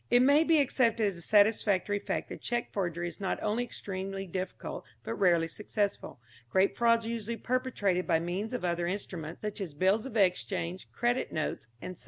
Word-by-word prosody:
It 245 +1 +6
may 285 +4 +6
be 325 -1 +4
accepted 235 -5 +2
as 200 -2 0
a 170 - -7
satisfactory 205 0 +3
fact - - -3
that - - -7
cheque 240 0 -2
forgery 175 -3 -1
is 170 - -8
not 195 - -1
only 220 +4 +1
extremely 195 -4 -5
difficult, 185 +1 -5 0.2
but - - -3
rarely 170 -4 +3
successful. 205 - -3 0.3
Great 190 +6 +3
frauds 230 -1 +3
are - - -3
usually 230 0 -3
perpetrated 235 -9 0
by 165 -2 +3
means 180 +6 -3
of 245 -7 -2
other 170 0 0
instruments, 175 -3 -5
such 210 0 -3
as 165 -7 -5
bills 195 - +2
of 230 - -4
exchange, 185 -2 0
credit 240 +1 0
notes, 155 -6 -3 0.2
&c. 185 - -5
200 Hz, 185 wpm, -30 LUFS, 180-230 Hz, 0.3 s, It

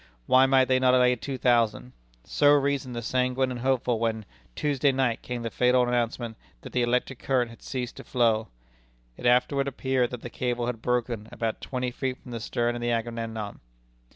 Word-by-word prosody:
Why 130 - +5
might 130 -1 +5
they 130 0 +2
not 130 0 +4
lay 125 0 +4
two 130 +3 -5
thousand? 115 - +1 0.3
So 145 - +3
reasoned 140 -3 0
the 120 - -4
sanguine 130 +2 0
and 125 - -5
hopeful 125 -2 +1
when, 110 -2 -1 0.3
Tuesday 145 -1 +1
night, 130 -3 0
came 125 -1 -5
the 115 - -3
fatal 125 +1 +3
announcement 120 -1 -1 0.2
that - - -10
the 125 - +1
electric 125 +1 0
current 125 -3 0
had 115 - -15
ceased 125 -2 -5
to - - -8
flow. 115 -3 +1 0.7
It 120 - -2
afterward 130 +3 +3
appeared 130 -2 0
that 125 -2 -7
the 120 - -7
cable 120 -1 -2
had 120 -2 -4
broken 120 -3 -1
about 115 -1 -3
twenty 125 -1 -3
feet 130 +1 -3
from 125 - -13
the 115 - -4
stern 120 +2 -1
of 120 - -5
the 120 - -1
Agamemnon. 115 -2 -3
125 Hz, 190 wpm, -27 LUFS, 115-130 Hz, 0.7 s, Why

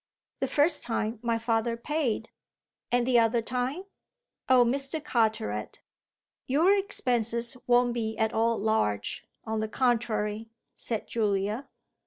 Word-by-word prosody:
"The - - 0
first 300 +2 +3
time 225 -1 -2
my 235 -1 0
father 230 0 0
paid." 245 -4 -2 0.6
"And 245 0 +2
the 245 -1 +4
other 230 0 +2
time?" 255 +9 -2 0.7
"Oh 255 -2 +6
Mr. 275 +5 -1
Carteret." 220 - -1 0.7
"Your 320 +9 +4
expenses 240 - +1
won't 245 0 +4
be 220 -2 -3
at 220 0 0
all 230 0 +2
large; 150 - -1 0.2
on 220 -1 -2
the 215 0 -2
contrary," 220 -3 0 0.2
said 225 -3 -4
Julia. 210 +3 -1
235 Hz, 125 wpm, -28 LUFS, 220-250 Hz, 0.7 s, Oh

